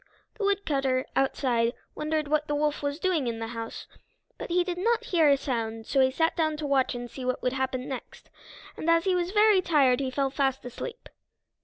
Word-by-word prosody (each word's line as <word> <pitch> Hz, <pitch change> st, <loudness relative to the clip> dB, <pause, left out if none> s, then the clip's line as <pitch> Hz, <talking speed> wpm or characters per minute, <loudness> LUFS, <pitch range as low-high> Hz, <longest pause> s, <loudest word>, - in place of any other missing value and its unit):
The 445 Hz, -, -6 dB
woodcutter, 275 Hz, -10 st, +1 dB
outside, 245 Hz, -3 st, +1 dB, 0.2 s
wondered 305 Hz, 0 st, -1 dB
what 300 Hz, 0 st, +1 dB
the 295 Hz, -, -1 dB
wolf 295 Hz, 0 st, 0 dB
was 285 Hz, 0 st, -2 dB
doing 340 Hz, -7 st, 0 dB
in 230 Hz, -1 st, -2 dB
the 225 Hz, 0 st, -5 dB
house, 230 Hz, -1 st, -6 dB, 0.5 s
but -, -, -6 dB
he 355 Hz, +1 st, +3 dB
did 355 Hz, -1 st, -4 dB
not 465 Hz, +4 st, +1 dB
hear 335 Hz, -10 st, +3 dB
a 280 Hz, -, +5 dB
sound, 225 Hz, -4 st, -3 dB
so 275 Hz, -, 0 dB
he 260 Hz, -, +5 dB
sat 325 Hz, +5 st, +1 dB
down 315 Hz, -2 st, 0 dB
to 300 Hz, -, -4 dB
watch 270 Hz, -3 st, +1 dB
and 245 Hz, 0 st, -5 dB
see 255 Hz, +2 st, -9 dB
what 255 Hz, 0 st, -2 dB
would 250 Hz, -, +1 dB
happen 260 Hz, -1 st, -2 dB
next, 265 Hz, -3 st, -8 dB, 0.4 s
and 320 Hz, -, -3 dB
as 335 Hz, 0 st, +4 dB
he 380 Hz, -, +2 dB
was 355 Hz, -1 st, 0 dB
very 420 Hz, -1 st, +5 dB
tired 275 Hz, -8 st, +3 dB
he 270 Hz, -2 st, -1 dB
fell 270 Hz, +1 st, -1 dB
fast 270 Hz, -2 st, 0 dB
asleep. 470 Hz, -, -7 dB
285 Hz, 210 wpm, -27 LUFS, 255-335 Hz, 0.5 s, a